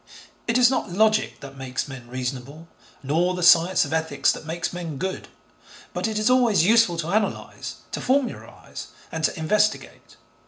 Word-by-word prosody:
It 230 Hz, +1 st, +2 dB
is 250 Hz, 0 st, +5 dB
not 260 Hz, -, -1 dB
logic 215 Hz, +3 st, +1 dB
that 135 Hz, -1 st, -10 dB
makes 130 Hz, +1 st, -3 dB
men 130 Hz, -3 st, -10 dB
reasonable, 130 Hz, +5 st, -6 dB, 0.4 s
nor 170 Hz, +6 st, +1 dB
the 180 Hz, -, -3 dB
science 170 Hz, +2 st, +5 dB
of -, -, -5 dB
ethics 160 Hz, -3 st, +1 dB
that 155 Hz, -, -7 dB
makes 170 Hz, +2 st, -3 dB
men 170 Hz, -5 st, -5 dB
good, 190 Hz, +6 st, -4 dB, 0.7 s
but -, -, -1 dB
it 220 Hz, -1 st, -3 dB
is 215 Hz, +1 st, +1 dB
always 245 Hz, -9 st, +4 dB
useful 225 Hz, -5 st, +4 dB
to 165 Hz, +1 st, -3 dB
analyse, 210 Hz, 0 st, -2 dB, 0.2 s
to -, -, -3 dB
formularise 265 Hz, 0 st, -3 dB, 0.2 s
and 160 Hz, -1 st, -4 dB
to -, -, -1 dB
investigate. 210 Hz, +7 st, -1 dB
175 Hz, 165 wpm, -24 LUFS, 150-215 Hz, 0.7 s, is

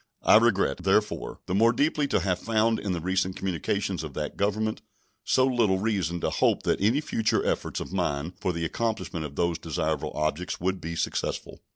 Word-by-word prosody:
I -, -, +7 dB
regret, 105 Hz, -10 st, +2 dB
therefore, -, -, 0 dB
the -, -, -3 dB
more 115 Hz, +4 st, +5 dB
deeply 145 Hz, +3 st, +1 dB
to 100 Hz, -, +1 dB
have 90 Hz, 0 st, 0 dB
found 115 Hz, 0 st, +1 dB
in 100 Hz, -, -3 dB
the 90 Hz, -, -1 dB
recent 95 Hz, +2 st, 0 dB
communications 95 Hz, 0 st, -2 dB
of 75 Hz, -3 st, -7 dB
that 75 Hz, -1 st, -3 dB
Government 110 Hz, +2 st, -1 dB, 0.4 s
so 130 Hz, -, +3 dB
little 115 Hz, -7 st, +2 dB
reason 95 Hz, -5 st, -1 dB
to -, -, 0 dB
hope -, -, +2 dB
that -, -, 0 dB
any 115 Hz, +9 st, +3 dB
future 110 Hz, -7 st, 0 dB
efforts -, -, -1 dB
of -, -, -7 dB
mine 70 Hz, +5 st, -1 dB
for 90 Hz, -, +1 dB
the 85 Hz, -1 st, -3 dB
accomplishment 110 Hz, -5 st, -2 dB
of 70 Hz, -1 st, -8 dB
those 85 Hz, 0 st, 0 dB
desirable 80 Hz, -1 st, -2 dB
objects 75 Hz, +3 st, -2 dB
would 95 Hz, +1 st, -1 dB
be 85 Hz, +1 st, -4 dB
successful. -, -, -3 dB
95 Hz, 190 wpm, -27 LUFS, 85-110 Hz, 0.4 s, I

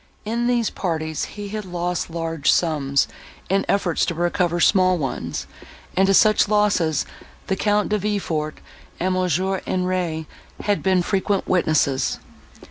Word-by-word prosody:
In 235 Hz, +2 st, -1 dB
these 240 Hz, -2 st, +1 dB
parties 160 Hz, -4 st, -2 dB
he 205 Hz, -1 st, -8 dB
had 215 Hz, +1 st, -4 dB
lost 175 Hz, -2 st, -3 dB
large 165 Hz, -3 st, 0 dB
sums, 140 Hz, -5 st, +1 dB, 0.4 s
in 195 Hz, +1 st, +2 dB
efforts 190 Hz, -4 st, +1 dB
to 170 Hz, -, -2 dB
recover 175 Hz, 0 st, 0 dB
small 185 Hz, 0 st, +4 dB
ones, 135 Hz, -5 st, -3 dB, 0.5 s
and 190 Hz, +1 st, +4 dB
to 195 Hz, -, +4 dB
such 215 Hz, +1 st, +5 dB
losses 200 Hz, -8 st, +2 dB, 0.4 s
the 190 Hz, -, 0 dB
Count 210 Hz, +1 st, +1 dB
De 210 Hz, 0 st, +1 dB
Villefort 175 Hz, -7 st, -2 dB, 0.4 s
and 185 Hz, +2 st, 0 dB
Mons. 180 Hz, -3 st, +1 dB
Henri 185 Hz, -3 st, -1 dB, 0.4 s
had 205 Hz, -1 st, 0 dB
been 185 Hz, -2 st, +2 dB
frequent 195 Hz, +1 st, 0 dB
witnesses. 155 Hz, -7 st, +1 dB
185 Hz, 135 wpm, -22 LUFS, 165-200 Hz, 0.5 s, such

